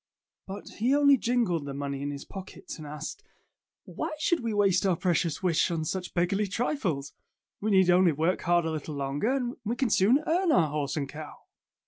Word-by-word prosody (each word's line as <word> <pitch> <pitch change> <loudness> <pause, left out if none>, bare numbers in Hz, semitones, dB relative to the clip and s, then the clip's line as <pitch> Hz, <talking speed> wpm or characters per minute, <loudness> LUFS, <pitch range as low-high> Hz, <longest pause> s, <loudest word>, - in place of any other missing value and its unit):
But 195 +1 -7
he 250 +6 +3
only 285 -1 +6
jingled 230 - 0
the 140 -1 -5
money 140 -1 -4
in 145 - -2
his 140 -1 -6
pockets 190 -3 -9
and 150 - -8
asked, 150 - -6 0.6
"Why 315 0 -4
should 330 +3 +1
we 230 -2 -2
waste 200 -3 +3
our 190 -3 +2
precious 170 -1 0
wish 175 -4 +2
on 165 -2 -2
such 180 +3 -4
beggarly 195 +4 +1
trifles? 185 - -2 0.5
We 215 - -1
need 190 -3 +5
only 180 -1 +5
work 160 +5 0
hard 175 -1 +2
a 160 - -1
little 155 -1 -5
longer, 140 - -1
and 250 -2 -2
we 225 +3 -1
can 260 -2 0
soon 240 +11 +4
earn 345 +1 +2
our 165 - +4
horse 150 0 -2
and 140 -2 -1
cow." 150 +2 -9
180 Hz, 195 wpm, -28 LUFS, 155-230 Hz, 0.6 s, only